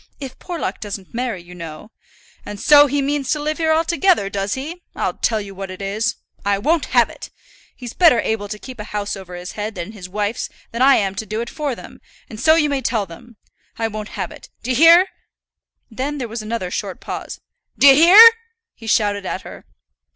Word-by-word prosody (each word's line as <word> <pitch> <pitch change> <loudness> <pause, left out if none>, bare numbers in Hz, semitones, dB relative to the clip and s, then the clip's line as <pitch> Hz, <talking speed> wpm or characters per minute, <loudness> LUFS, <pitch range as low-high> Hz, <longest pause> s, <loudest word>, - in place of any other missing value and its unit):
If 270 -3 -8
Porlock 350 -3 -4
doesn't 200 -3 -7
marry, 230 -7 -3
you 175 +1 -13
know 170 +4 -9 0.3
" - - -30
"And 205 -1 -8
so 290 +4 +7
he 280 0 -1
means 280 -1 -2
to 300 - +1
live 305 +2 -3
here 320 -1 +2
altogether, 335 - +2
does 200 0 -2
he? 315 +7 -7
I'll - - -1
tell 220 -2 0
you 200 -1 -8
what 195 0 -7
it 185 - -9
is, 200 +3 -2 0.3
I 200 0 +1
won't 310 +10 +1
have - - +4
it. - - -10 0.5
He's 245 -2 -8
better 330 -10 +5
able 220 -2 -2
to 210 +1 -6
keep 255 +2 -11
a - - -4
house 205 0 -2
over 185 -2 -10
his 180 0 -7
own - - -16
head 210 0 -4
and 180 +5 -6
his 185 -4 -10
wife's 210 +3 -3 0.2
than 235 - -4
I 275 +1 +6
am 195 -2 0
to 215 +2 -6
do 215 +3 -3
it 235 0 -5
for 290 -5 -3
them, - - -13 0.3
and 215 - -8
so 315 +5 +5
you 310 -2 +3
may 280 -2 -1
tell 230 -4 -1
them. 225 +6 -14 0.4
I 225 - 0
won't 215 0 -7
have - - -3
it. - - -13
D'ye 255 +2 -1
hear?" 335 +7 +7 0.8
Then 275 +6 -3
there 250 -4 -4
was 225 +1 -6
another 215 -4 -4
short - - -4
pause. - - -7 0.4
"D'ye 275 -1 +8
hear?" 375 +10 +9 0.4
he 225 - -13
shouted 205 -3 +1
at - - -4
her. - - -11
225 Hz, 215 wpm, -20 LUFS, 205-290 Hz, 0.8 s, hear